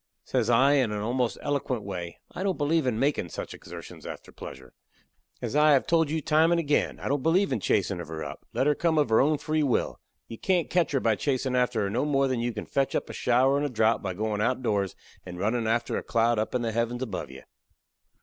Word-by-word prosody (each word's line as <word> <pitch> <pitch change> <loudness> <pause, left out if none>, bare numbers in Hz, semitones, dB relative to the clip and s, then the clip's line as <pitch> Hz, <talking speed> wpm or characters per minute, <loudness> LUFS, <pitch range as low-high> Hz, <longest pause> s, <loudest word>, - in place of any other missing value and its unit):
Says - - 0
I, 130 +4 +5
in 130 -6 +2
a 105 0 -3
almost 125 0 0
eloquent 135 -6 -1
way: 90 -4 -6
"I - - -6
don't 190 -1 0
believe 150 0 +1
in 115 -3 0
makin' 135 -9 0
such - - -6
exertions - - -10
after - - -8
pleasure. - - -10 0.7
As - - -3
I 150 0 +6
have 135 - +3
told 165 -3 +2
you 160 +1 -1
time 160 +3 +3
and 170 - +3
agin, 150 -3 0
I - - -5
don't 140 0 0
believe 175 +6 +2
in 120 - 0
chasin' 95 -2 0
of 85 - -8
her 80 0 -5
up. - - -8
Let - - 0
her 150 - +4
come 160 +1 +1
of 145 -5 +3
her 110 - +5
own 150 +3 +3
free 155 +2 -1
will. 140 -5 0 0.3
You 115 - -9
can't 180 -3 +1
ketch 170 -5 +2
her 135 - +3
by 115 -4 +1
chasin' 130 -2 -1
after 125 -3 +1
her 100 - 0
no 120 +6 0
more 140 -2 +2
than 130 -2 -1
you 120 +1 -1
can - - -6
fetch 135 -1 0
up - - -2
a - - -9
shower 130 +3 +3
in - - -1
a 145 - 0
drowth 110 -2 +2
by 95 -3 -4
goin' 105 +1 -2
outdoors 110 -6 0 0.3
and 90 -1 -8
runnin' 110 +4 0
after 115 +1 0
a - - -2
cloud 115 0 +1
up 110 - -2
in 125 - 0
the 115 - -1
heavens 115 +2 -1
above 100 - -5
you. 65 0 -11
125 Hz, 245 wpm, -27 LUFS, 110-145 Hz, 0.7 s, I